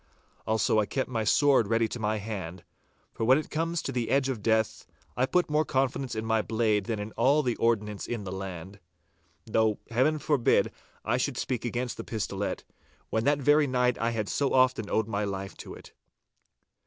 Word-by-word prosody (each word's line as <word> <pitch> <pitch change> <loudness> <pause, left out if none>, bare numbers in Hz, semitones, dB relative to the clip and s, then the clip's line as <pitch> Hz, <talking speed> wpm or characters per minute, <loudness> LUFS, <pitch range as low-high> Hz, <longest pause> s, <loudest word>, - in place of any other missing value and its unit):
Also 110 0 +2
I 105 - +1
kept 130 -1 -2
my 115 -2 -1
sword 135 -1 +4
ready 115 +1 +2
to 120 - -5
my 110 0 0
hand, 95 -5 -6 0.5
for - - -4
when 130 +4 +5
it 155 - -5
comes 165 +2 -1
to - - -3
the 120 -3 -2
edge 135 0 +2
of 120 -5 -3
death, 110 0 0 0.3
I 130 +1 +1
put 180 +4 +2
more 150 +1 +2
confidence 135 -3 -1
in 110 0 -3
my 110 -1 +2
blade 110 -2 0
than 115 -2 -2
in 105 +1 -5
all 140 +7 +3
the 120 -3 0
ordnance 105 -3 0
in 115 -3 -3
the 95 - -6
land. 95 0 -7 0.7
Though 110 -1 +1
Heaven 130 +7 +2
forbid 145 -4 +2
that - - -9 0.3
I 120 +3 +1
should 130 0 -1
speak 125 -2 -2
against 120 +1 -3
the - - -5
pistolet, 100 -3 -3 0.5
when 110 +1 0
that 145 +1 +3
very 145 +2 +4
night 125 -1 +1
I 115 - +1
had 110 -3 -2
so 140 -2 0
often 130 -5 +3
owed 110 -1 +1
my 105 -1 -1
life 95 -1 -4
to - - -9
it. - - -14
115 Hz, 200 wpm, -28 LUFS, 105-130 Hz, 0.7 s, when